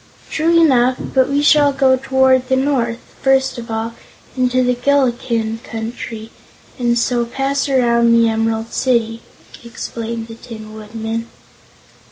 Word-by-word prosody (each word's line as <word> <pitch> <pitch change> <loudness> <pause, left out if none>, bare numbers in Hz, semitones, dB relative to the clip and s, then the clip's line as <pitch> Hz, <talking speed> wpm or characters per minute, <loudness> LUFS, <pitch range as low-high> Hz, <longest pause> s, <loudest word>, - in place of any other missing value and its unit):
"True 335 +2 +2
enough; 255 -5 +4 0.2
but 260 0 +3
we 285 +1 +1
shall 295 -1 +5
go 270 -1 +3
toward 260 0 +2
the 260 - +3
north, 260 -4 0 0.2
first 265 -2 +2
of 230 0 -9
all, 225 +1 -3 0.4
into 255 0 +1
the 250 0 +2
Gillikin 240 -4 0
Country, 225 -1 -7 0.5
and 240 -1 +1
so 240 0 +1
pass 270 +3 -2
around 235 -3 +3
the 230 0 +4
Emerald 225 0 -1
City," 230 -3 0 0.4
explained 230 -1 -6
the 225 - -9
Tin 220 -2 -10
Woodman. 220 +1 -5
240 Hz, 135 wpm, -17 LUFS, 225-265 Hz, 0.5 s, shall